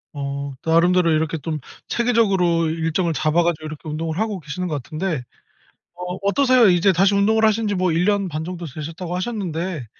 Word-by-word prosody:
어. 140 0 -4
나름대로 170 +1 +3
이렇게 160 +1 0
좀 155 +1 -4 0.3
체계적으로 195 -9 +2
일정을 165 +1 -1
잡아 155 +2 +2
가지고 165 -2 -1
이렇게 155 0 -7
운동을 160 +3 -3
하고 215 -3 -1
계시는 165 +4 -5
것 150 -5 -3
같은데 155 -1 -3 0.7
어 180 0 -5
어떠세요? 255 +2 +4
이제 180 +2 +4
다시 195 +3 +3
운동을 220 +3 +3
하신 220 0 +2
지 205 - 0
뭐 185 -2 +1
1 165 +2 +1
년 200 -2 +1
반 155 +1 -4
정도 175 0 -6
되셨다고 160 +5 -6
하셨는데 180 - -3
175 Hz, 390 characters per minute, -21 LUFS, 155-195 Hz, 0.7 s, 어떠세요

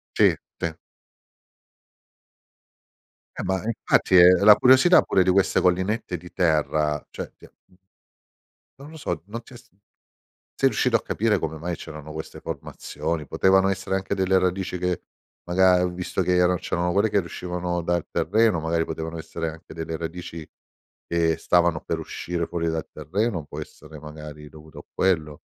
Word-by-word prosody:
Sì, - - +5 0.2
sì. 85 - -1 2.7
Eh - - -4
ma 95 -1 -1
infatti, 110 -4 +2
è 90 0 +9
la 105 +1 +9
curiosità 130 +8 +6
pure 95 - +2
di 95 - +2
queste 95 +1 +3
collinette 95 +2 0
di 90 +1 -13
terra, 75 -3 +1
cioè - - -7
ti - - -19
ha, - - -16
mhmm 90 - -26 1.0
non 140 +2 -11
lo 160 - -11
so, 85 - -4
non 115 +3 -7
ti 125 - -16
è - - -10
s - - -17 0.9
sei 135 - +5
riuscito 125 -3 +1
a 110 - +2
capire, 105 -2 +1
come 80 -2 -4
mai 85 +1 -3
c'erano 75 -2 -9
queste 80 0 -8
formazioni? 80 -3 -5
Potevano 95 0 +3
essere 95 0 -3
anche 95 0 -2
delle 95 0 +2
radici 90 0 -1
che 90 -1 -2 0.4
maga 90 0 +4
visto 90 +1 -3
che 90 - +1
era 90 0 +3
c'erano 90 +1 -1
quelle 105 +2 +2
che 100 - +3
riuscivano 90 -1 -4
dal 85 -1 -1
terreno, 105 0 +2
magari 80 +1 0
potevano 80 +1 -5
essere 80 0 -4
anche 80 0 -13
delle 80 0 -4
radici 85 -1 -7 0.6
che 85 -1 +1
stavano 85 -3 +2
per 80 - -3
uscire 85 +1 -4
fuori 85 -1 -2
dal 80 -1 -3
terreno, 90 - -2
può - - -8
essere 75 -1 -11
magari 75 -1 -10
dovuto 80 0 -13
a - - -13
quello 80 -6 0
90 Hz, 160 wpm, -24 LUFS, 80-95 Hz, 2.7 s, è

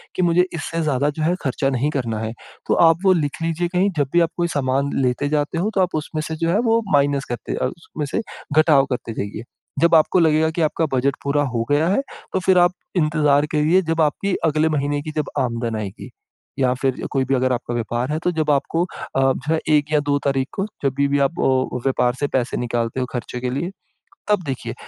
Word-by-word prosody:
कि - - 0
मुझे, 175 +1 +4
इससे 165 +1 -3
ज़्यादा 145 -1 +1
जो 155 +1 -3
है 175 +3 +2
खर्चा 135 0 0
नहीं 130 +3 0
करना 115 -6 -2
है। 110 +1 -4 0.3
तो - - +2 0.2
आप 165 - +3
वो 190 - +6
लिख 145 +3 -4
लीजिए 165 +1 0
कहीं 185 +3 +3
जब 140 -2 +1
भी 175 - +5
आप 165 - +2
कोई 170 0 +1
सामान 135 +1 0
लेते 130 +3 0
जाते 150 +2 0
हो, 205 +5 0
तो 190 - +3
आप 180 -3 0
उसमें 155 0 -3
से 160 - -4
जो 165 +1 0
है 205 - +2
वो 230 0 +3
माइनस 140 -1 +2
करते 120 - -4
उसमें 155 0 -6
से - - +1 0.4
घटाव 150 -3 +5
करते 115 -2 -4
जाइए, 105 +2 -5 0.4
जब 170 0 +5
आपको 160 +3 +4
लगेगा 160 -1 +3
कि 165 +1 -2
आपका 160 +1 +1
बजट 135 +2 +1
पूरा 145 +1 +1
हो 120 -4 -1
गया 155 +3 +3
है 200 +8 +2 0.3
तो - - +1
फिर 185 0 +3
आप 175 +1 +5 0.3
इंतज़ार 150 -2 +3
करिए, 155 +5 +3
जब 165 0 0
आपकी 185 +6 +1
अगले 155 +1 +2
महीने 145 -1 -1
की 155 - -5
जब 150 - -1
आमदन 115 -3 -1
आएगी 100 -3 -6 0.5
या 125 -1 +3
फिर 135 -2 -1
कोई 135 -2 +1
भी 135 +1 +1
अगर 130 0 +1
आपका 120 0 -3
व्यापार 120 +3 -2
है 155 - 0
तो 180 - +2
जब 155 -2 -1
आपको 165 +4 +1
अ, 135 - -6
जो 135 +3 +1
है 160 - +1 0.2
1 145 -1 +3
या 150 - +5
2 145 - +3
तारीख 135 -1 +1
को 195 - -2 0.2
जब 135 -1 +1
भी 140 0 +3
भी 140 0 +2
आप 140 +5 0
अ, 130 -1 +1
व्यापार 125 -2 +2
से 145 - 0
पैसे 130 -3 -1
निकालते 120 0 -2
हो 125 - 0
खर्चे 125 0 -4
के 125 - -1
लिए 170 +8 -2 0.6
तब 205 -3 +3
देखिए। 125 -4 -4
145 Hz, 230 wpm, -21 LUFS, 130-165 Hz, 0.6 s, वो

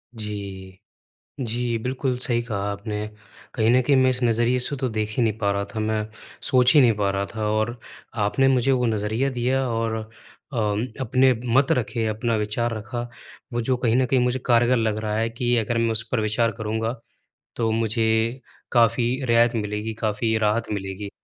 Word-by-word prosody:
जी। 100 -3 -7 0.6
जी 120 -1 -1
बिल्कुल, 125 +2 -2
सही 120 -1 +2
कहा 115 -4 -4
आपने, 105 +1 -4 0.5
कहीं 110 -2 +2
न 130 - +5
कहीं 140 +3 +2
मैं 130 0 +4
इस 130 0 -1
नज़रिए 120 +2 +2
से 125 +3 -2
तो 130 -1 -1
देख 110 -1 -2
ही 125 - +3
नहीं 110 -1 0
पा 100 -2 +1
रहा 100 0 -1
था, - - -2
मैं 110 0 -1 0.3
सोच 125 -1 +4
ही 150 - +7
नहीं 120 -3 +5
पा 100 -1 +1
रहा 100 0 -1
था 110 -1 -1
और 110 +3 -1 0.5
आपने 135 +6 +2
मुझे 130 0 +3
वो 125 -2 +2
नज़रिया 110 +4 0
दिया 130 +1 0
और 115 -1 -1 0.6
अ, - - -3 0.4
अपने 130 +1 +3 0.2
मत 135 +1 +4
रखे, 115 -1 0
अपना 110 +2 -1
विचार 115 +3 -1
रखा। 110 +3 -5 0.5
वो 120 - 0
जो 130 +3 +1
कहीं 120 -2 +1
न 130 - +3
कहीं 130 0 +2
मुझे 125 +1 +1
कारगर 120 +1 +4
लग 110 -2 0
रहा 110 -1 -2
है 115 +1 0
कि 120 +1 0
अगर 115 +1 0
मैं 115 0 +1
उस 110 0 -1
पर 125 - +1
विचार 110 +2 +1
करूँगा, 110 +1 -2 0.6
तो 115 -1 0
मुझे 110 +2 +1 0.3
काफ़ी 120 0 +3 0.2
रियायत 120 0 +3
मिलेगी, 105 0 -3
काफ़ी 110 +1 -1
राहत 110 +1 +1
मिलेगी। 100 0 -4
115 Hz, 185 wpm, -23 LUFS, 110-125 Hz, 0.6 s, ही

